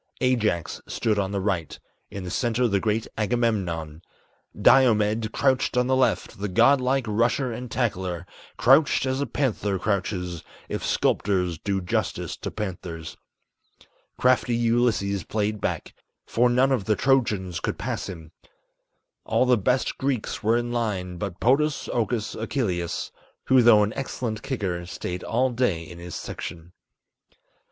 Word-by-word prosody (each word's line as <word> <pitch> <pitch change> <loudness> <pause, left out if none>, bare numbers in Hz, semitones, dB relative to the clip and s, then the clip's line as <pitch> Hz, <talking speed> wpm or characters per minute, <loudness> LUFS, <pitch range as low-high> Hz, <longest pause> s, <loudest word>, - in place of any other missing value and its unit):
Ajax 110 -10 0
stood 105 -2 0
on 95 -1 -1
the 100 - -1
right; 95 -5 -2 0.3
in 100 - -6
the 90 - -5
center 120 +3 +1
the 100 -3 +1
great 110 +2 -1
Agamemnon; 95 -9 -1 0.6
Diomed 110 -3 +4
crouched 130 -2 +1
on 125 - +3
the 130 +1 +2
left, 110 -8 0
the 105 - -2
god 120 +8 +4
like 130 0 +1
rusher 120 +4 +1
and 125 +2 -6
tackler, 95 -8 -2 0.3
Crouched 135 +3 +4
as 130 +1 -1
a 140 - -1
panther 105 -8 -1
crouches, 90 -4 -2 0.2
if - - -4
sculptors 90 -5 +1
do 100 -1 -1
justice 90 - -2
to - - -5
panthers. 90 -6 -6 1.0
Crafty 125 -1 +3
Ulysses 115 -4 +1
played 105 -1 -2
back, - - -3 0.3
for 120 +2 +2
none 130 +3 +3
of 120 -7 0
the 105 - +2
Trojans 105 -10 +1
could - - -3
pass - - -3
him, 80 -3 -9 0.9
All - - +2
the 125 -1 +5
best 125 +4 0
Greeks 135 -4 -2
were 110 +2 +3
in 120 0 -2
line, 100 -7 -2
but 100 -3 -4
Podas 145 +4 +2
Okus 115 -2 -1
Achilleus, 100 - -2 0.4
Who 130 -1 +7
though 115 -3 +7
an 105 +1 -1
excellent 120 -4 -4
kicker 95 -10 -3
stayed 90 0 -5
all 130 +3 +1
day 115 -9 0
in 85 +1 -11
his 85 0 -7
section. 85 +1 -7
110 Hz, 145 wpm, -25 LUFS, 95-125 Hz, 1.0 s, Who